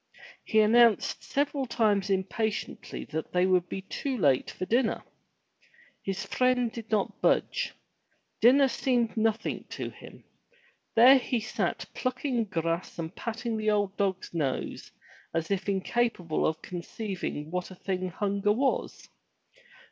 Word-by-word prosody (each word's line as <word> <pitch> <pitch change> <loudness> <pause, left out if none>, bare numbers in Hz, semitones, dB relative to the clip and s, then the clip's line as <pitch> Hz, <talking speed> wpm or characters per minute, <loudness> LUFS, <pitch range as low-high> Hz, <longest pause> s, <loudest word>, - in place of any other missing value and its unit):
He 220 - +3
announced 230 0 +4
several 280 -1 -1
times 210 -4 +2
impatiently 205 +3 -2
that 160 0 -4
they 180 0 +3
would 180 -1 +2
be 190 - -5
too 265 +6 -3
late 140 - +3
for 185 - -5
dinner. 235 +4 +1 1.0
His 195 +1 -3
friend 250 -2 +2
did 225 -1 -8
not 215 -3 -1
budge. - - +1 0.6
Dinner 270 +4 +6
seemed 245 -2 0
nothing 220 0 0
to - - -5
him. - - -13 0.7
There 255 +4 +8
he 245 -1 -1
sat 220 - -2
plucking 255 -2 -1
grass 165 -2 -2
and 165 +2 -5
patting 230 0 -3
the 215 0 0
old 205 -2 +1
dog's 195 -3 -1
nose 145 -6 -2 0.5
as 165 +3 -1
if 195 +1 -1
incapable 195 -4 0
of 160 0 -3
conceiving 180 -3 -5
what 180 0 -2
a 185 - -10
thing 185 0 -3
hunger 200 +3 0
was. 265 +4 -1
210 Hz, 135 wpm, -28 LUFS, 185-235 Hz, 1.0 s, There